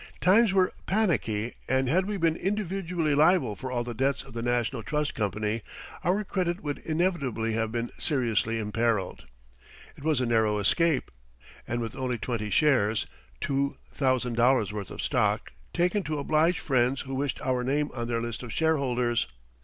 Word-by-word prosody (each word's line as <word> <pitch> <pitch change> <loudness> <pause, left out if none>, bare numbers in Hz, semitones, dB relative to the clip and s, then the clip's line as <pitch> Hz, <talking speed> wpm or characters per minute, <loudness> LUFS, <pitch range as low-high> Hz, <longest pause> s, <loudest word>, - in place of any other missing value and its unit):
Times 205 +3 +5
were 190 -1 +3
panicky, 125 - 0 0.2
and 130 0 +2
had 185 +8 +2
we 210 -1 -2
been 165 -3 +2
individually 180 -5 -1
liable 155 - +4
for 130 +3 -6
all 120 -1 0
the 120 0 -5
debts 135 +4 0
of 135 -3 -14
the 115 - -4
National 120 0 0
Trust 150 +5 -1
Company 105 +2 -1 0.4
our 195 +4 +1
credit 185 -2 -2
would 145 -2 -3
inevitably 150 - -1
have 110 0 -1
been 120 +1 -2
seriously 115 -6 +1
imperiled. 110 -1 -1 0.7
It - - -13
was 155 -4 +2
a 125 - +1
narrow 110 -3 +2
escape. 130 - +2 0.6
And 120 0 -2
with 115 -1 -4
only 130 -2 -2
twenty 110 -2 -3
shares 115 -6 +3 0.3
(two 140 0 -1
thousand 130 -3 0
dollars' 120 -4 +3
worth 100 -3 -5
of - - -6
stock), - - +1 0.2
taken 180 +4 +1
to 155 -1 -2
oblige 155 +4 +2
friends 130 -1 +1
who 135 -1 -6
wished 135 0 -1
our 125 -1 0
name 145 +3 0
on 120 -2 -3
their 115 -1 -1
list 120 -1 -4
of 120 -2 -7
shareholders! 125 - +1
130 Hz, 170 wpm, -28 LUFS, 115-160 Hz, 0.7 s, Times